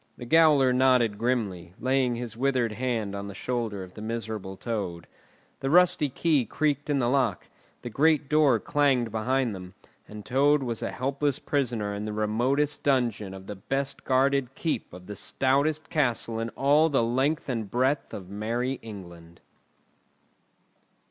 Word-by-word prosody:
The 120 - -8
gaoler 145 -2 +5
nodded 125 -5 +3
grimly, 100 -8 -2
laying 130 -1 +1
his 120 -2 -6
withered 130 -2 +1
hand 110 -3 -2
on 100 0 -5
the 100 - -8
shoulder 115 -3 -3
of 90 0 -12
the 105 - -10
miserable 110 -4 -5
Toad. 95 -8 -4 0.5
The 135 - -2
rusty 170 -3 +4
key 150 0 +1
creaked 145 +4 -1
in 145 - +2
the 125 -3 +1
lock, 125 -7 +1 0.4
the 120 - -4
great 150 +3 +3
door 150 -6 +4
clanged 135 -5 +1
behind 120 +2 0
them; 90 -1 -9 0.3
and 105 -1 -10
Toad 140 +3 +3
was 115 -3 -3
a - - -2
helpless 140 +2 -1
prisoner 120 -8 -1
in 100 +1 -4
the 105 - -4
remotest 120 +8 0
dungeon 115 -8 0
of 95 0 -11
the 105 - -6
best 135 +7 -3
guarded 135 0 +1
keep 160 - -2
of 90 +1 -11
the 105 - -7
stoutest 140 +8 0
castle 120 -6 0
in 115 0 -2
all 145 +4 +4
the 135 -5 +2
length 130 +7 0
and 115 -6 -3
breadth 130 +5 0
of 95 -3 -7
Merry 115 +6 -2
England. 85 -6 -11
125 Hz, 160 wpm, -27 LUFS, 105-140 Hz, 0.5 s, gaoler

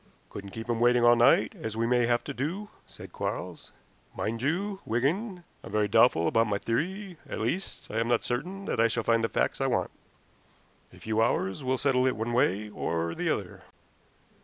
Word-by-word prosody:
"Couldn't 100 0 -7
keep 115 +3 -7
him 120 -1 -1
waiting 120 0 +4
all 120 0 +7
night, 115 -2 +4
as 110 0 -5
we 115 - +1
may 120 0 +2
have 120 0 +1
to - - -5
do," 175 - -3 0.2
said - - -12
Quarles. - - -5 0.5
"Mind 115 +1 -2
you, 190 +8 -1
Wigan, 175 - -1 0.2
I'm - - -9
very 105 0 +2
doubtful 105 -6 +4
about 115 +6 +3
my 100 -1 0
theory; 180 - -3
at - - -4
least, 145 - -3
I 110 - -1
am 115 - 0
not 120 -1 +2
certain 185 +11 -3
that - - -2
I 115 - +5
shall 115 0 -2
find 115 0 +2
the 115 - +1
facts - - 0
I - - +2
want. - - 0 1.0
A - - -16
few 110 0 0
hours 105 +1 0
will 130 0 0
settle 130 -1 +2
it 130 - +1
one 115 +2 -3
way 105 -3 +2
or 85 -5 -2
the - - -2
other." - - -3
120 Hz, 200 wpm, -28 LUFS, 110-140 Hz, 1.0 s, all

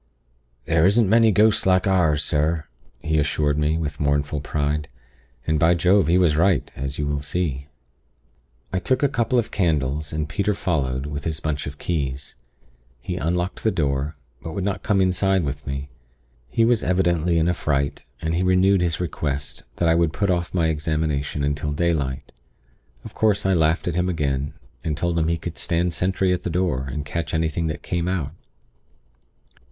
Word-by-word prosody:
"'There 80 +1 +2
isn't 105 +2 +4
many 115 +2 +5
ghosts 105 +1 +3
like 95 0 +4
ours, 85 -6 +2
sir,' 75 +1 0 0.4
he 80 0 +1
assured 75 0 +1
me, 75 +1 +1
with 75 -3 -4
mournful 70 0 0
pride. 75 +1 -1 0.6
And, 80 -1 +1
by 80 +3 +4
Jove! 90 +1 +3
he 85 +2 +4
was 85 -5 +3
right, 85 -2 +2
as 70 +2 -4
you 75 - -1
will 75 0 -1
see. 70 -2 -3 1.1
"I 95 - +1
took 130 +8 0
a - - +6
couple 125 -2 0
of 120 - 0
candles, 75 -5 0
and 75 -1 -2
Peter 100 +5 0
followed 70 -8 -1
with 75 0 -5
his 80 -2 -2
bunch 75 -3 -2
of 70 0 -7
keys. 70 -5 -3 0.6
He - - -4
unlocked 90 +5 -1
the 110 - +2
door; 70 -4 -1 0.3
but 80 - -6
would 95 - -3
not 100 0 -2
come 100 -3 +2
inside 95 0 +2
with 70 -1 -4
me. 70 +1 -4 0.6
He 115 - +2
was 115 -1 +3
evidently 85 -2 +1
in 80 0 +2
a 90 - +3
fright, 70 -4 -1 0.2
and 80 0 0
he 85 - +1
renewed 95 +1 +4
his 85 -2 0
request 70 -4 -3
that 85 - +1
I 80 - +5
would 85 -2 +2
put 100 +2 +1
off 85 -1 -1
my 85 -3 +1
examination 75 -2 -1
until 75 +1 -1
daylight. 75 -4 -1 0.7
Of - - -9
course, 105 -2 +1
I 95 - +3
laughed 80 0 +2
at 90 - 0
him 90 +2 0
again, 70 -3 -1 0.3
and 80 -3 -2
told 85 0 0
him 80 - +1
he 85 0 +1
could 85 +1 -6
stand 85 0 0
sentry 95 +1 +1
at 90 - -2
the - - -3
door, 80 -7 0
and 75 +2 -4
catch 80 0 -3
anything 80 +1 0
that 80 - -4
came 85 0 -2
out. 85 -7 -1
80 Hz, 185 wpm, -23 LUFS, 75-90 Hz, 1.1 s, a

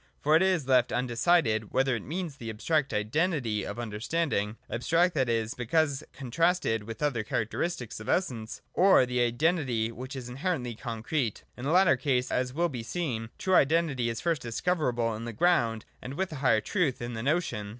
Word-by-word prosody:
For 150 +2 +3
it 160 - +5
is 185 -7 +2
left 125 -2 +4
undecided, 120 - +1
whether 130 -1 +2
it 115 - -4
means 165 0 -4
the 115 -3 -6
abstract 140 +6 0
Identity 115 - 0
of - - -5
understanding, 115 0 -2
— - - -36
abstract, 165 +8 +2
that 130 -6 +1
is, 115 -1 0
because 140 +3 0
contrasted 135 - 0
with 115 0 -6
the 150 - -1
other 120 -7 0
characteristics 115 - -2
of 110 - -8
Essence, 120 -12 -1
or 190 -8 +5
the 125 0 -1
Identity 120 -2 +1
which 130 +4 -8
is 130 -2 -6
inherently 130 -1 -2
concrete. 115 +1 -3
In 125 - -7
the 145 - 0
latter 185 +1 +5
case, 130 -4 0
as 125 0 0
will 170 +6 +1
be 130 -7 -5
seen, 115 -3 -3
true 190 - -1
Identity 145 -6 +3
is 115 0 -4
first 165 -5 0
discoverable 120 -2 0
in 115 +2 -6
the 120 - -5
Ground, 115 -6 +2 0.2
and, 130 +2 -7
with 190 +2 -2
a 155 - -5
higher 130 -5 +3
truth, 155 - 0
in 120 0 -5
the 115 - -4
Notion. 135 -7 -1
125 Hz, 190 wpm, -28 LUFS, 115-160 Hz, 0.2 s, it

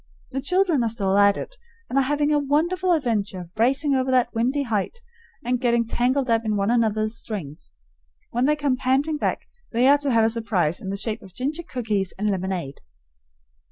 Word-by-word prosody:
The 270 - -3
children 360 -1 +2
are 230 - +1
still 200 -4 0
at 200 0 +5
it, - - -7 0.3
and 270 - +1
are - - +4
having 295 +2 +1
a 295 - +3
wonderful 340 +6 +1
adventure 210 - -1
racing 270 +5 +2
over 260 0 +1
that 250 -2 +2
windy 255 +5 0
height 230 - -2 0.5
and 250 0 0
getting 235 -1 +2
tangled 255 +4 0
up 230 -1 +2
in 215 -1 -1
one 200 +2 +1
another's 220 -2 +1
strings. 170 -11 -6 0.6
When 245 +2 +1
they 300 +2 +3
come 285 -3 0
panting 270 +4 +1
back - - -1 0.3
they 245 +2 +3
are 285 +1 +6
to 285 -1 -1
have 230 -3 +3
a 225 - +3
surprise 205 -8 -1
in 190 - -6
the 200 - -3
shape 220 +2 -3
of 185 -1 -15
ginger 290 +6 -2
cookies 215 - -3
and 210 +1 0
lemonade. 185 -7 -3
240 Hz, 195 wpm, -23 LUFS, 210-280 Hz, 0.6 s, are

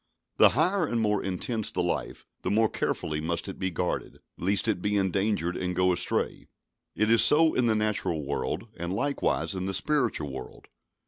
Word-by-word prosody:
The - - +8
higher 175 +2 +2
and 120 - -1
more 105 -2 +1
intense 105 +4 -1
the - - -2
life, - - -3 0.2
the - - -2
more 110 +2 +3
carefully 75 -1 -2
must 85 +4 -2
it 95 - -7
be 95 - -1
guarded, 90 0 -3 0.2
lest 100 +5 +1
it 100 -5 0
be 105 +1 0
endangered 95 -2 0
and 90 -1 -3
go 90 0 +3
astray. - - -1 0.5
It 110 +1 +1
is 115 - +6
so 160 +1 +5
in 125 -2 +1
the 110 - +2
natural 105 -8 -1
world, 75 +8 -3
and 85 +1 -4
likewise 140 +1 -1
in 95 0 -3
the 95 - -1
spiritual 120 - 0
world. 65 -1 -10
100 Hz, 185 wpm, -27 LUFS, 90-115 Hz, 0.5 s, The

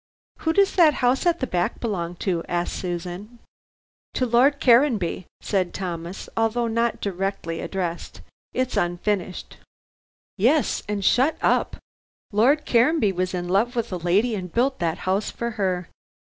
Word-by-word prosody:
"Who 320 - 0
does 395 +2 +3
that 320 -4 +6
house 255 +6 +1
at 340 -1 +1
the - - +1
back 175 -7 -1
belong 180 -7 -3
to?" 175 -4 0
asked 175 0 -1
Susan. 180 +5 -5 0.8
"To 255 - +1
Lord 255 +4 +3
Caranby," 235 - +3
said 185 -4 -1
Thomas, 175 -1 -5
although 225 +1 +1
not 230 0 0
directly 195 -3 -3
addressed. 175 -3 -4 0.3
"It's 255 -1 -1
unfinished." 180 +1 -2 0.8
"Yes 265 +9 +2
and 200 -2 -2
shut 265 +6 +3
up. - - +2 0.6
Lord 265 +9 +3
Caranby 240 -2 +3
was 185 0 -2
in 175 0 -3
love 210 +7 +1
with 235 -2 -2
a - - -1
lady 190 +8 +1
and 185 -4 -5
built 260 +6 +1
that 165 -2 -1
house 190 +3 0
for 235 0 -4
her. 185 -5 -1
205 Hz, 145 wpm, -24 LUFS, 180-245 Hz, 0.8 s, that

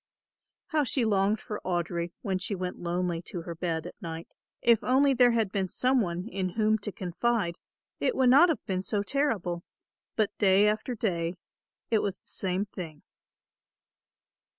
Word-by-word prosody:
How 310 -3 +2
she 255 -2 +1
longed 205 0 +2
for 210 - -6
Audry 175 -1 -1
when 190 -2 -1
she 200 +2 -2
went 180 -1 -4
lonely 175 -1 -1
to 175 -3 -6
her 170 - -5
bed 165 -1 -2
at 180 - -10
night. 165 -2 -7 0.3
If 235 -2 +5
only 270 +2 +4
there 250 -1 +6
had 220 -4 +1
been 195 -2 -1
some 255 +5 +2
one 175 0 -3
in 190 -5 -2
whom 220 0 +2
to 205 0 -4
confide 185 0 -1 0.4
it 485 - +1
would 255 -1 +4
not 290 +7 +7
have 320 - -1
been 185 -1 -1
so 200 +1 -1
terrible; 205 -10 0 0.5
but 215 -2 0
day 200 0 +5
after 220 +4 -1
day 175 -6 -1 0.6
it 220 - +4
was 200 -3 -2
the - - -24
same 190 +1 -1
thing. 170 -7 -8
195 Hz, 170 wpm, -28 LUFS, 175-225 Hz, 0.6 s, not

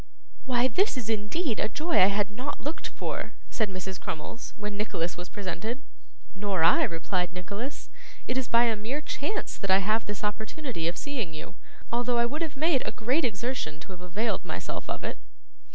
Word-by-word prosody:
'Why 250 -1 +4
this 330 - +3
is 225 -3 0
indeed 225 +6 0
a - - +2
joy 320 +9 +3
I 185 - +9
had 205 0 +2
not 255 +7 -3
looked 300 +3 -3
for!' - - -3 0.2
said 220 -3 +1
Mrs. 185 0 -4
Crummles, 165 +9 -5
when 210 -1 -3
Nicholas 175 -5 -1
was 175 +1 -6
presented. 210 +7 -3 0.5
'Nor 195 -4 +1
I,' 165 - +7
replied 180 +2 0
Nicholas. 200 +9 -4 0.4
'It 250 - +1
is 260 -2 +1
by 235 0 +6
a 230 -2 +3
mere 230 +8 -2
chance 380 +8 -2
that 200 - -2
I 190 - +8
have 215 +3 +2
this 205 0 -4
opportunity 220 - -1
of 170 - -1
seeing 240 - -2
you, 155 - -6 0.4
although 240 0 +3
I 235 - +5
would 295 +7 -2
have 315 -4 -2
made 310 -3 +4
a - - -1
great 255 +9 +2
exertion 225 - -1
to - - -9
have 180 -1 -8
availed 195 +6 0
myself - - -4
of - - -2
it. - - -3
220 Hz, 190 wpm, -29 LUFS, 190-255 Hz, 0.5 s, I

